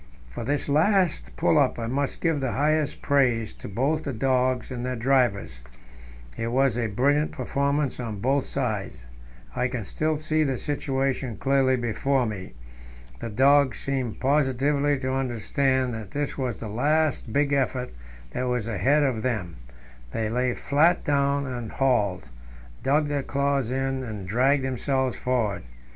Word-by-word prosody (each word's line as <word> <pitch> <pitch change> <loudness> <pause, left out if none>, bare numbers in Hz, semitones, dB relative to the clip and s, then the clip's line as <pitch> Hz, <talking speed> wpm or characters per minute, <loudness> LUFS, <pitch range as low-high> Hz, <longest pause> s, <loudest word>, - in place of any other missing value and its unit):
For - - -6
this 145 +4 -1
last 155 - +2
pull - - +3
up - - +2
I 115 - -3
must 135 +4 -2
give 165 -3 +1
the 130 -3 -2
highest 150 +1 0
praise 125 -6 +2
both 135 +10 -1
to 145 - -4
the 120 - -7
dogs 130 0 +1
and 125 -1 -4
their 125 0 -2
drivers; 115 - +1 0.7
it 115 - -3
was 130 0 +2
a 120 -2 0
brilliant 140 +8 +1
performance 140 0 -1
on 110 -4 -4
both 135 +5 +1
sides. 105 - -3 0.5
I 125 - +1
can 125 -4 -4
still 155 +6 -1
see 155 +1 +1
the 135 -3 -1
situation 135 -4 -2
clearly 135 0 +2
before 125 +2 0
me. 100 -4 -6 0.7
The 115 - -5
dogs 135 +4 +4
seemed 130 -5 -3
positively 140 +1 +2
to 130 0 -2
understand 130 0 0
that 110 -3 -6
this 145 +3 -3
was 125 -4 -3
the 110 - -5
last 145 +3 0
big 145 +3 +1
effort 130 -2 0 0.4
that 125 - -2
was 125 -3 -1
asked 115 +2 -3 0.2
of 130 -6 0
them; 105 - -2 0.6
they 110 -1 -1
lay 125 +1 0
flat 155 +5 +2
down 140 0 +1
and 120 -4 -5
hauled, 115 -9 +1 0.5
dug 145 +4 +2
their 145 -1 -1
claws 140 -2 0
in 135 +1 -1
and 105 -6 -6
dragged 130 +7 +2
themselves 130 0 -1
forward. 120 -6 -1
130 Hz, 155 wpm, -25 LUFS, 120-140 Hz, 0.7 s, dogs